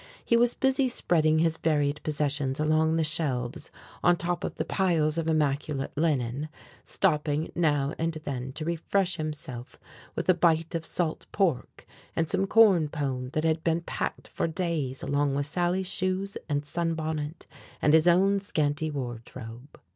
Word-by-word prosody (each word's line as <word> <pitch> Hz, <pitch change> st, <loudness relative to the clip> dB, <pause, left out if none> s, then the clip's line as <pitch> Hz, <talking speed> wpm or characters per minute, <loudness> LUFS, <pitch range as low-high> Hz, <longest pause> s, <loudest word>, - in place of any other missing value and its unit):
He 235 Hz, -, +3 dB
was 240 Hz, +1 st, +3 dB
busy 265 Hz, 0 st, +2 dB
spreading 160 Hz, -9 st, +2 dB
his 165 Hz, 0 st, +2 dB
varied 150 Hz, -2 st, +1 dB
possessions 145 Hz, -3 st, -1 dB
along 155 Hz, +1 st, +2 dB
the 165 Hz, -, +2 dB
shelves 145 Hz, -3 st, -1 dB, 0.3 s
on 175 Hz, 0 st, +5 dB
top 175 Hz, +1 st, -2 dB
of -, -, -3 dB
the -, -, -2 dB
piles 165 Hz, -5 st, +1 dB
of 165 Hz, 0 st, -1 dB
immaculate 145 Hz, -2 st, 0 dB
linen, 145 Hz, -2 st, 0 dB, 0.3 s
stopping 150 Hz, +1 st, 0 dB
now 145 Hz, -4 st, +1 dB
and 165 Hz, +1 st, 0 dB
then 130 Hz, -2 st, -4 dB
to 155 Hz, +2 st, -5 dB
refresh 175 Hz, +2 st, 0 dB
himself 145 Hz, -6 st, -6 dB, 0.4 s
with -, -, -3 dB
a 185 Hz, -, +7 dB
bite 165 Hz, -1 st, +2 dB
of 165 Hz, -1 st, -3 dB
salt 170 Hz, -3 st, -2 dB
pork 175 Hz, -11 st, -1 dB, 0.3 s
and 165 Hz, -, +1 dB
some 190 Hz, +4 st, 0 dB
corn 195 Hz, -8 st, +5 dB
pone 135 Hz, -5 st, -3 dB
that 155 Hz, -, 0 dB
had 160 Hz, 0 st, +1 dB
been 165 Hz, 0 st, +1 dB
packed -, -, -4 dB
for -, -, -2 dB
days 160 Hz, -6 st, -2 dB
along 145 Hz, -1 st, +1 dB
with 140 Hz, 0 st, 0 dB
Sally's 175 Hz, +4 st, 0 dB
shoes 185 Hz, +1 st, -1 dB
and 145 Hz, 0 st, -1 dB
sunbonnet 160 Hz, -1 st, -3 dB, 0.3 s
and 150 Hz, -, +3 dB
his 160 Hz, +1 st, +5 dB
own 195 Hz, +3 st, +4 dB
scanty 155 Hz, -5 st, -1 dB
wardrobe. 120 Hz, -1 st, -7 dB
155 Hz, 155 wpm, -27 LUFS, 145-170 Hz, 0.4 s, a